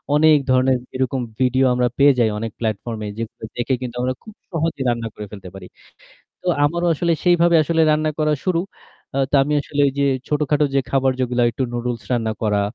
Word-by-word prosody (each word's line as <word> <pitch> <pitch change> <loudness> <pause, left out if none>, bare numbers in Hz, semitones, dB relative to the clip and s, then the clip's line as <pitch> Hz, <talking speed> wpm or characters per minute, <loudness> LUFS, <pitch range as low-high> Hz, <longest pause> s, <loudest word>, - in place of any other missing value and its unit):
অনেক 155 0 +6
ধরনের 130 0 +3 0.2
এরকম 130 0 -1 0.2
ভিডিও 130 +1 +3
আমরা 125 0 +2
পেয়ে 140 0 +6
যাই 115 -2 +3
অনেক 115 0 -4
প্ল্যাটফর্মে 110 0 -3
যেগুলো 115 -1 -7
দেখে 120 +2 0
কিন্তু 125 -2 -5
আমরা 130 +1 0
খুব 215 - -12 0.2
সহজেই 165 -4 -1
রান্না 115 -1 -1
করে 105 - -7
ফেলতে 100 -3 -9
পারি। 95 -2 -10 0.8
তো - - -12 0.2
আমারও 170 +4 0
আসলে 170 +2 0
সেইভাবে 175 -1 +4
আসলে 165 +2 +1
রান্না 155 0 +1
করা 155 -1 +2
শুরু। 185 -3 +1 0.6
আ - - +1
তো - - -3
আমি 145 - -1
আসলে 145 0 -4
ঐযে 140 +1 -1 0.2
ছোটখাটো 150 0 +1
যে 135 - +4
খাবার 135 -1 +2
যেগুলা 125 -1 0
একটু 130 - -4
নুডুলস 120 -1 -3
রান্না 115 -2 0
করা, 105 -2 +1
130 Hz, 190 wpm, -20 LUFS, 120-150 Hz, 0.8 s, অনেক